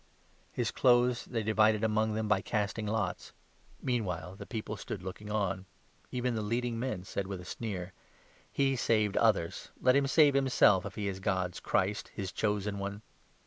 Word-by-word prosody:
"] - - -34
His - - -1
clothes 125 -1 +3
they 115 -3 -2
divided 110 0 +3
among 110 0 +1
them 110 0 -1
by 105 -2 +3
casting 105 0 -2
lots. 105 -4 -2 0.5
Mean 125 -2 +1
35 - - -4
while 90 +1 -4
the - - -9
people 110 -2 -4
stood 100 -2 -6
looking 95 +3 -7
on. 100 -3 -1 0.4
Even 125 -1 -1
the 110 - -1
leading 115 +2 -1
men 115 -7 -3
said 95 0 -4
with 95 -2 -5
a 90 - -10
sneer: 95 -4 -5 0.3
" - - -30
He 135 -1 +3
saved 110 -4 +1
others, 100 -7 +1
let 130 - +4
him 140 0 +3
save 145 0 +5
himself, 130 -8 +4
if 100 - -10
he 105 -1 -2
is 95 -1 -3
God's 95 -2 -1
Christ, 100 +2 0
his 95 -2 -4
Chosen 105 -1 -1
One." 100 +2 -5
105 Hz, 185 wpm, -31 LUFS, 95-115 Hz, 0.5 s, save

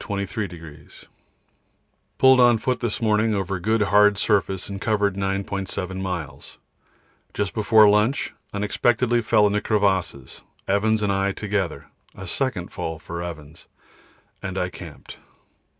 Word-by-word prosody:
Pulled 130 -1 +6
on 120 -2 +6
foot 125 +2 -2
in 120 - 0
the - - -4
morning 110 0 +2
over 95 -1 -2
good 110 +4 +1
hard 105 0 +4
surface 95 -2 0
and 100 -1 -7
covered 105 -2 +1
9.7 95 -1 -3
miles. 90 -6 -6 0.8
Just 100 -2 -2
before 110 0 +5
lunch 105 +6 +2 0.2
unexpectedly 120 +4 +1
fell 110 -2 +3
into 105 0 +1
crevasses, 95 - -1 0.3
Evans 105 +2 +1
and 100 - +1
I 100 0 0
together 100 -5 -3 0.2
a - - -8
second - - -2
fall 80 0 -4
for 85 +1 -7
Evans, 80 -2 -9 0.7
and 95 -1 -5
I 90 -1 -1
camped. 85 - -11
100 Hz, 125 wpm, -23 LUFS, 95-110 Hz, 0.8 s, Pulled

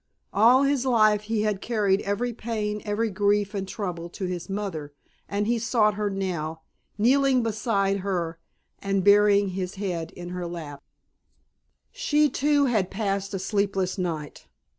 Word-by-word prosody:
All 240 +6 +6
his 280 -2 +1
life 215 -5 +4
he 220 -2 +1
had 210 -3 -1
carried 205 -4 +1
every 235 +5 -2
pain, 215 -2 -3
every 215 +1 -1
grief 205 +1 +1
and 195 -2 -3
trouble 175 -4 -5
to 185 - -5
his 180 0 -4
mother, 175 -8 -4 0.3
and 205 +1 -1
he 235 +2 +1
sought 220 -2 +2
her 205 0 -1
now, 170 -5 -3 0.4
kneeling 260 +3 +3
beside 210 -3 0
her 175 -4 -3 0.4
and 195 -1 0
burying 205 0 +5
his 185 0 -4
head 180 -5 -3
in 175 0 -8
her 180 -1 -4
lap. 155 -5 -7 1.1
She, 300 0 +2
too, 290 +1 +2
had 215 -8 +1
passed 195 -1 -2
a - - 0
sleepless 195 -1 -1
night. 160 -5 -4
200 Hz, 150 wpm, -25 LUFS, 185-220 Hz, 1.1 s, All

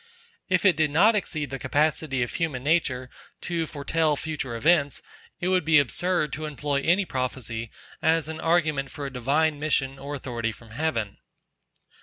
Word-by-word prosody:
If 185 +1 +2
it 190 - +6
did 155 -2 +2
not 200 +10 +5
exceed 155 -9 -2
the 135 - -4
capacity 145 -1 +1
of 120 - -5
human 150 -7 -2
nature 140 -5 +1 0.3
to 170 -2 -1
foretell 150 +1 0
future 145 -5 -4
events, 145 +2 +2 0.4
it 180 - -1
would 185 -1 +3
be 155 0 +5
absurd 150 +3 +1
to 155 +1 -4
employ 145 -1 -1
any 180 +6 +3
prophecy 125 -5 -3 0.3
as 160 -1 +2
an 160 0 -5
argument 155 -5 +1
for 145 - -6
a 135 - -6
divine 145 +5 +1
mission 135 -3 0
or 145 +1 -5
authority 120 -4 -3
from 110 +1 -15
heaven. 115 -6 -2
150 Hz, 165 wpm, -26 LUFS, 135-160 Hz, 0.4 s, it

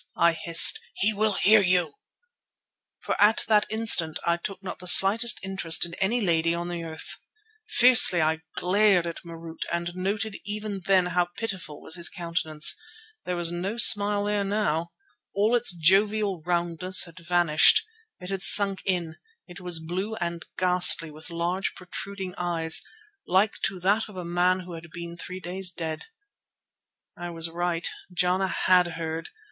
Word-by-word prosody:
I 170 0 +3
hissed. 170 - +5 0.2
"He 215 +2 0
will 215 0 0
hear 210 +2 +4
you," 180 -5 0 1.1
for - - -3
at 210 +2 +3
that 210 -1 +2
instant 215 -8 +2
I 170 - +1
took 195 +2 -8
not 190 - -8
the 180 - -7
slightest 220 +6 +5
interest 175 -4 +2
in 170 - -11
any 220 +6 0
lady 165 -3 0
on 175 +1 -5
the 175 -1 -5
earth. 160 -1 -8 0.5
Fiercely 245 -7 +6
I 160 0 0 0.2
glared 195 -1 +2
at 170 -1 -7
Marût 165 -1 -11
and 170 0 -4
noted 195 +3 -4
even 210 -1 -6
then 190 -2 +3
how 180 -1 +1
pitiful 190 -9 -6
was - - -3
his 170 - -2
countenance. 165 -3 0 0.5
There 180 - -3
was 170 -1 0
no 185 +6 -5
smile 205 -3 +5
there 205 0 -2
now. 195 -5 -2 0.5
All 210 +4 +1
its 240 -3 +3
jovial 195 +2 +1
roundness 175 +2 +1
had 170 +1 -11
vanished. 175 - +3 0.3
It 180 +1 -8
had 195 -1 -4
sunk 195 -1 +5
in; 175 -4 -2 0.3
it 175 0 -12
was 180 -2 -2
blue 185 +7 -5
and 170 -4 -5
ghastly 180 -3 +3
with 155 +3 -11
large, 175 +3 -3
protruding 190 +1 -7
eyes, 165 -2 0 0.5
like 190 +4 0
to 190 - -4
that 205 +4 0
of 205 - -14
a 180 -1 -7
man 180 +2 0
who 180 -1 -11
had 165 0 -11
been 170 0 -9
three 180 +1 -8
days 185 +1 -7
dead. 160 -3 -7 1.1
I 175 0 -8
was 165 -1 -5
right—Jana 180 +2 -2
had 180 -1 +2
heard. 165 0 -6
180 Hz, 160 wpm, -25 LUFS, 170-200 Hz, 1.1 s, Fiercely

